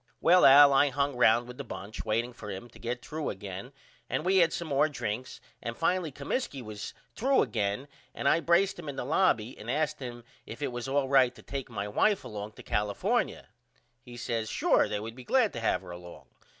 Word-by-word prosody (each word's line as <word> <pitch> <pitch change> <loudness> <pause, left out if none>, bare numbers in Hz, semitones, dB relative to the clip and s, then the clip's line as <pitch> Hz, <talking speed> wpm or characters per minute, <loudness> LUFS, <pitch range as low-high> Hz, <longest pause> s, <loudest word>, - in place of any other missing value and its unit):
Well 180 +2 +6
Al 140 +1 +9
I 145 +1 +5
hung 140 +1 -1
round 120 0 +4
with 125 +1 -10
the - - -3
bunch 105 -3 -7
waiting 115 +3 -1
for 105 -3 -9
him 95 +4 -6
to - - -16
get 120 +1 -4
threw 155 0 -3
again 100 +4 -7 0.4
and 155 - -2
we 190 +1 +3
had 170 -3 +5
some 170 - -4
more 145 +2 +3
drinks 125 -3 -4 0.2
and 115 0 -5
finally 170 -1 0
Comiskey 140 - -3
was 105 -2 -7 0.2
threw 270 +3 +3
again 110 +1 -2 0.3
and - - -2
I 160 - +4
braced 175 +3 +2
him 155 -4 -6
in 140 - -5
the - - -4
lobby 130 - +2
and 110 - -8
asked 150 +3 0
him 120 -2 -7 0.2
if 115 +6 -7
it 140 - -1
was 120 +1 -5
all 135 0 +1
right 130 -2 +4
to - - -15
take 135 -3 -5
my 105 -3 -4
wife 200 - +2
along 105 -1 -7
to - - -13
California. 105 -1 -1 0.5
He 120 0 -12
says 115 -2 -2
Sure - - +3
they 105 - -2
would 110 +2 -6
be 125 +1 -11
glad 250 - +2
to - - -4
have 110 -4 0
her 90 - -9
along. 85 0 -11
125 Hz, 215 wpm, -29 LUFS, 110-145 Hz, 0.5 s, Al